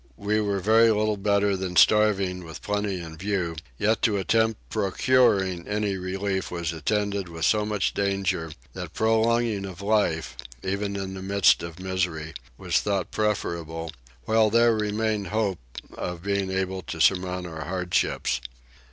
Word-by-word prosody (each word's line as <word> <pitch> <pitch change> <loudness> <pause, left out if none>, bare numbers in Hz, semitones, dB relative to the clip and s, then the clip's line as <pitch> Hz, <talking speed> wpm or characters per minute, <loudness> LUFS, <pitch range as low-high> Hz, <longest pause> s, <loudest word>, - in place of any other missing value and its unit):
We 105 +1 0
were 100 -2 0
very 110 +4 +5
little 110 0 +2
better 100 0 +2
than 95 -1 -4
starving 100 -3 +4
with 80 -2 -10
plenty 105 -2 -1
in 80 -2 -8
view; 90 -2 -2 0.2
yet 110 - +1
to 105 -4 +2
attempt 110 +3 +1
procuring 100 -4 +2
any 105 -1 -1
relief 95 +1 -2
was 85 -2 -3
attended 100 +3 -1
with 80 -1 -3
so 105 -1 +2
much 105 -2 0
danger 95 -5 -1 0.2
that - - -7
prolonging 110 -1 +2
of 95 -2 -7
life, 80 - +1 0.3
even 100 +1 -2
in 95 -1 -4
the 95 - -7
midst 100 0 +4
of 85 0 -7
misery, 90 -4 -2 0.2
was - - +1
thought 100 -3 -1
preferable, 85 -6 -2 0.3
while 110 -1 +4
there 115 +1 +4
remained 105 -1 -1
hopes 105 -6 -1 0.3
of 90 -1 -5
being 100 -1 0
able 95 0 -2
to 80 -1 -7
surmount 90 +1 +2
our 80 -2 -6
hardships. 90 -7 0
100 Hz, 150 wpm, -25 LUFS, 90-105 Hz, 0.3 s, very